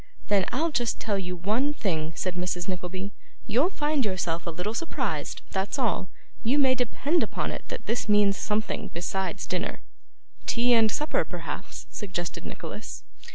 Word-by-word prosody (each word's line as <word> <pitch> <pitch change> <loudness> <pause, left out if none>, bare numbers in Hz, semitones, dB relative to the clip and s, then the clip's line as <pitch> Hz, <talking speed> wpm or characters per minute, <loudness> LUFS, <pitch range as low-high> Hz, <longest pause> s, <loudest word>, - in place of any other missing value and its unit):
'Then 200 -3 +5
I'll 320 +5 +1
just 240 -5 +1
tell 205 -3 0
you 180 -1 -3
one 220 +11 +1
thing,' 160 - 0
said 185 +3 -1
Mrs. 180 0 -1
Nickleby, 185 +1 -3 0.3
you'll 245 - +3
find 295 -5 +1
yourself 175 -5 -1
a - - +2
little 180 +6 -2
surprised; 330 +8 -2
that's 195 +7 0
all. 230 -8 +1 0.3
You 250 +6 +3
may 265 -3 +6
depend 255 +6 +2
upon - - -1
it - - -6
that - - -5
this 230 -1 0
means 205 -1 +6
something 215 +2 -1
besides 190 +2 -1
dinner.' - - -2 0.7
'Tea 245 +1 +4
and 225 -2 +6
supper, 300 +7 +1
perhaps,' - - -6
suggested 180 -5 -4
Nicholas. - - -6
205 Hz, 155 wpm, -28 LUFS, 185-245 Hz, 0.7 s, may